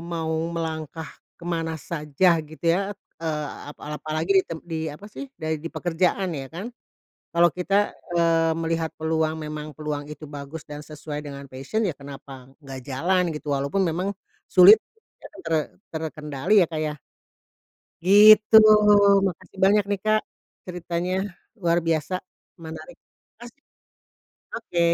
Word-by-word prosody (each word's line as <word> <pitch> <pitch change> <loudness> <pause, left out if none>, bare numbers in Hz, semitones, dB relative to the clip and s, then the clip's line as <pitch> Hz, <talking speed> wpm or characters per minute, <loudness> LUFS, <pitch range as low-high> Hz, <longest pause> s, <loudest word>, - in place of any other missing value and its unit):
mau 165 -1 -3 0.2
melangkah 160 -2 -5 0.3
ke 170 - -14
mana 165 -2 -2
saja 160 +2 +1
gitu 155 +2 -13
ya, 195 +5 +2
t - - -61 0.2
eee, 155 -2 -2 0.2
ap 150 - -10 0.2
apalagi 155 +4 -3
di - - -8
tem 165 - -5
di 165 -2 -4
apa 150 +7 -10
sih, 280 - -7
dai 155 -1 -3
di 165 - -5
pekerjaan 180 +2 0
ya 135 -3 -5
kan. 195 +9 -7 0.6
Kalau 170 0 +6
kita, 195 +4 +1 0.2
eee, 165 -1 +3
melihat 165 0 -2
peluang, 160 0 0
memang 150 0 -6
peluang 150 -1 -4
itu 150 0 -9
bagus 145 +2 -8
dan 150 0 -8
sesuai 150 0 -7
dengan 140 -1 -7
passion, 135 +13 -3
ya 175 -8 -1
kenapa 135 -2 -11 0.2
nggak 135 -1 -8
jalan 175 +8 +1
gitu, 150 0 -7
walaupun 140 +8 0
memang 180 +3 -1 0.3
sulit 195 +4 +8 0.4
te - - -12 0.2
ter 165 -1 -1 0.4
terkendali 160 +4 0
ya, - - +2
Kak, 160 - -3
ya? 150 -1 -2 1.1
Gitu, 210 +2 +8 0.7
makasih 185 +1 -6
banyak 205 +1 +4
nih, 200 - 0
Kak, 215 0 +3 0.5
ceritanya 175 0 -3 0.5
luar 170 -1 +2
biasa 165 +2 0 0.5
menarik, 160 +12 -9 0.4
makasih. 240 +4 -14 1.0
Oke. 195 -6 -3
165 Hz, 140 wpm, -24 LUFS, 150-180 Hz, 1.1 s, sulit